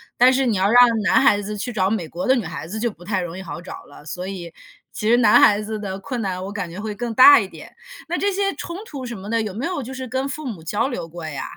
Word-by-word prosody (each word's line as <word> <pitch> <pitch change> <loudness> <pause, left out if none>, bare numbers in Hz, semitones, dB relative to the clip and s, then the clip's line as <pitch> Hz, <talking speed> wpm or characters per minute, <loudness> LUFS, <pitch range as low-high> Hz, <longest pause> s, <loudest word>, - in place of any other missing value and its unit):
但 250 +1 +6
是 265 +1 +1
你 230 -4 +1
要 195 +3 +2
让 245 - +8 0.2
男 195 +8 +4
孩 205 -7 +4
子 210 +1 -5
去 245 +4 -4
找 190 -3 +1
美 195 -7 -2
国 170 +3 -5
的 260 - +4
女 230 - -2
孩 165 0 -6
子， 220 +4 -4
就 235 +1 0
不 175 -4 -14
太 200 0 -1
容 175 -1 -5
易 - - -6
好 165 -2 -7
找 175 - -9
了。 145 - -16
所 180 +4 -6
以， 180 -4 -7 0.4
其 215 - -2
实 240 - +5
男 225 -4 +6
孩 205 0 +5
子 215 +1 -4
的 195 -2 -5
困 240 +4 -4
难， 185 -2 -3
我 - - -6
感 200 -4 -4
觉 180 - -8
会 210 0 -5
更 240 +1 -4
大 270 +5 +9
一 195 -4 -1
点。 - - -13 0.3
那 - - -2
这 405 - +1
些 395 0 -1
冲 340 - -6
突 275 -8 -7
什 235 -2 -6
么 200 +2 -9
的， 230 0 +1
有 210 -4 -4
没 235 +6 -4
有 340 -5 -3
就 255 +2 -8
是 260 0 -6
跟 260 +3 -2
父 305 +2 -6
母 195 -10 -6
交 205 +10 -1
流 220 - -4
过 165 -1 -8
呀？ 135 -3 -5
210 Hz, 320 characters per minute, -21 LUFS, 185-250 Hz, 0.4 s, 大